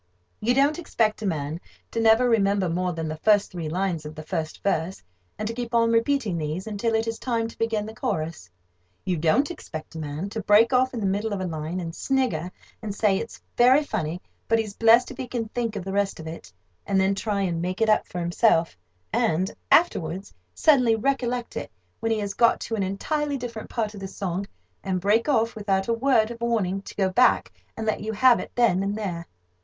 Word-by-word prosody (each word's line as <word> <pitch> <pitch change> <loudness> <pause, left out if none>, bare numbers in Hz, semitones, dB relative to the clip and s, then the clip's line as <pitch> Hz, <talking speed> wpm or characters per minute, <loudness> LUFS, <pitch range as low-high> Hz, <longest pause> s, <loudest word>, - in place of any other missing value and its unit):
You 240 +4 +1
don't 285 +5 +3
expect 220 -11 0
a 210 - -1
man 155 -1 -3 0.3
to 230 - -2
never 225 +2 +5
remember 200 -4 +2
more 180 +2 -1
than 165 -1 -4
the 155 0 -4
first 205 +4 +3
three 170 -4 -4
lines 180 -1 -1
of 150 0 -8
the 155 - -7
first 160 -1 -4
verse, 185 - -1 0.3
and 215 - -3
to 230 - -3
keep 240 0 -4
on 230 0 +4
repeating 230 -5 +1
these 155 +4 -3
until 220 +1 -1
it 225 +1 0
is 225 0 -3
time 230 -3 -1
to - - -14
begin 225 -2 0
the 220 - -8
chorus. 160 - -3 0.6
You 185 - 0
don't 170 - +2
expect 160 - -8
a 160 - -6
man 155 +5 -4
to 220 +2 -4
break 215 +5 +5
off 255 0 +2
in 230 - -3
the - - -1
middle 205 +3 0
of 200 - -2
a 185 - -2
line, 160 +1 -4
and 165 -2 -5
snigger, 245 - 0 0.3
and 210 -3 -5
say, 205 -2 +2
it's 230 - -7 0.2
very 255 +5 +5
funny, 180 - -3 0.3
but 225 - +3
he's 215 -3 -2
blest 230 +3 +5
if - - -10
he 260 - -5
can 230 -3 -3
think 230 -2 -2
of 195 -3 -5
the 195 - -4
rest 200 -2 0
of 160 - -8
it, 160 - -8 0.4
and 195 - +2
then 190 +1 +3
try 200 0 -1
and 170 -3 -1
make 185 +1 -3
it 225 - +3
up 215 - +3
for 180 - -8
himself, 170 0 +2 0.4
and, 175 +4 +1 0.2
afterwards, 190 - +2 0.2
suddenly 255 -7 +4
recollect 245 0 -1
it, - - -4 0.3
when 225 - -1
he 220 - +2
has 205 -1 -3
got 235 +2 +3
to - - -5
an 220 - 0
entirely 285 +10 -1
different 235 -3 -7
part 220 -3 -2
of 205 - -9
the 195 - -5
song, 190 0 -4 0.4
and 190 -2 -1
break 215 - +2
off, 230 -4 +2
without 195 -2 0
a 230 - +2
word 230 -2 +2
of 235 0 -9
warning, 205 -5 0
to - - -11
go 195 -2 +2
back 245 +7 +3 0.3
and 220 - -3
let 215 - 0
you 220 +1 -3
have 245 +3 +5
it - - -7
then 230 -7 +3
and 200 +1 -1
there. 175 -6 -4
210 Hz, 225 wpm, -25 LUFS, 180-230 Hz, 0.6 s, never